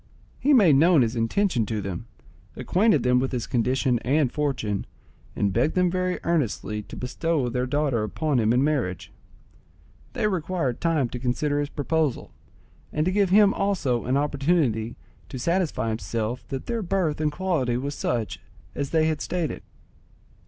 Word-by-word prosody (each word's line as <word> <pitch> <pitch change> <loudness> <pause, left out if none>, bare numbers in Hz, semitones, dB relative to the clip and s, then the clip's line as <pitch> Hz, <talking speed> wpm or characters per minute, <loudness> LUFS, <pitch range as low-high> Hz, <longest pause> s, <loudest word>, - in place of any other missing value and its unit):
He 290 - +2
made 195 - +6
known 160 -2 +5
his 115 +1 -2
intention 120 - +1
to 110 0 -2
them, 100 +2 -5 0.5
acquainted 185 - +2
them 125 0 +3
with 130 +1 -1
his 125 -3 -2
condition 125 +1 +1
and 135 +1 +1
fortune, 130 -9 -2 0.5
and 100 -2 0
begged 120 +9 +1
them 180 -1 +3
very 185 0 -1
earnestly 120 -9 -1
to - - -11
bestow 135 +1 -1
their 125 +1 -1
daughter 140 -4 0
upon 135 +6 0
him 110 -1 +2
in 125 +3 +3
marriage. 130 - -1 1.0
They - - -1
required 175 - -1
time 160 -6 +1
to 125 - -6
consider 145 +4 0
his 145 -1 -2
proposal, 150 -2 -1 0.6
and 150 +1 0
to 185 - +1
give 200 -1 +2
him 200 +1 +6
also 165 -12 0
an 130 +2 +1
opportunity 140 -6 0 0.3
to 130 - -6
satisfy 170 - 0
himself 115 +1 -3
that 135 -2 -5
their 235 -1 -2
birth 175 -5 -1
and 150 -1 +1
quality 150 -8 0
was 140 +3 -3
such 110 - -2 0.3
as 140 -1 -3
they 160 -1 +2
had 155 -2 -1
stated. 175 -4 -2
140 Hz, 160 wpm, -25 LUFS, 120-170 Hz, 1.0 s, made